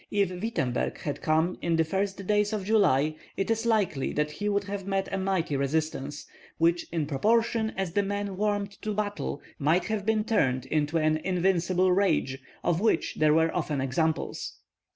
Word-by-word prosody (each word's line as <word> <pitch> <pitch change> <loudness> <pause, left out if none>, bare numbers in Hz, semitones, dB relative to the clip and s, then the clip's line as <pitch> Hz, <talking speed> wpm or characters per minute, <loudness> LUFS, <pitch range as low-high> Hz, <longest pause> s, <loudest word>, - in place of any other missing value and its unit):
If 200 -3 +1
Wittemberg 180 - -2
had 145 - -4
come 160 +3 +1
in 170 -1 +1
the 165 - +3
first 195 +3 -2
days 210 +1 +2
of 205 -3 -2
July, 155 -9 +3 0.2
it 195 +3 0
is 225 +1 0
likely 205 - +1
that 150 0 0
he 205 +7 -2
would 200 0 +1
have 200 -1 -5
met 195 -1 0
a - - +1
mighty 190 -6 0
resistance, 145 0 -2 0.3
which 170 +1 +2
in 165 -3 0
proportion 220 - +1
as 190 -3 -1
the 205 - +3
men 200 0 -3
warmed 205 0 0
to 215 -1 -3
battle 205 -8 -3 0.2
might 160 +6 +2
have 215 -2 -1
been 215 0 +1
turned 135 - +1
into 150 +2 0
an 155 0 +2
invincible 185 +1 +1
rage, 180 -8 +1 0.2
of 175 +1 +1
which 220 -7 +1
there 155 0 +4
were 165 0 +2
often 155 -5 -1
examples. 155 +5 -1
185 Hz, 175 wpm, -28 LUFS, 155-205 Hz, 0.3 s, there